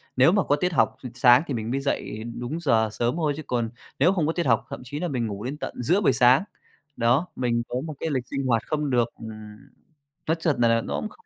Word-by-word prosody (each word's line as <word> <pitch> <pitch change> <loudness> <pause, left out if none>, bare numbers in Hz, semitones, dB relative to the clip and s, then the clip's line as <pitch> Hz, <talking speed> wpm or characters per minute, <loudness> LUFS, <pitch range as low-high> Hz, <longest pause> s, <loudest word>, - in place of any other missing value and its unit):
nếu 130 +6 +6
mà 200 -1 +2
có 145 - +2
tiết 180 +3 -1
học - - +2
s - - -10
sáng 125 +3 +6
thì 140 - -2
mình 115 0 -3
mới 135 - 0
dậy 115 -5 -3 0.2
đúng 125 +7 -4
giờ 110 -8 +2
sớm 120 +5 -1
thôi 155 -4 0
chứ 155 - -6
còn 120 -2 -1 0.3
nếu 175 +7 +4
không 160 -5 0
có 165 - 0
tiết 175 - -1
học, 115 -2 +2
thậm - - -7
chí 145 +4 -6
là 175 - -2
mình 125 -6 -2
ngủ 100 +1 -6
đến 140 +4 -4
tận - - -5
giữa 180 - +2
buổi 135 - +3
sáng. 125 +7 +5 0.5
Đó, 125 +9 +2
mình 120 -2 0
có - - -4
một 155 - -5
cái 160 - -2
lịch 125 -2 -2
sinh 140 -1 -3
hoạt 115 -2 +2
không 150 -2 -1
được, 120 -2 +2
ừm 110 - -7 1.0
nói 165 - +3
chật 150 -6 0
nà 115 -1 +3
nó - - -4
cũng 215 - -3
không 455 - -21
130 Hz, 260 wpm, -25 LUFS, 120-155 Hz, 1.0 s, nếu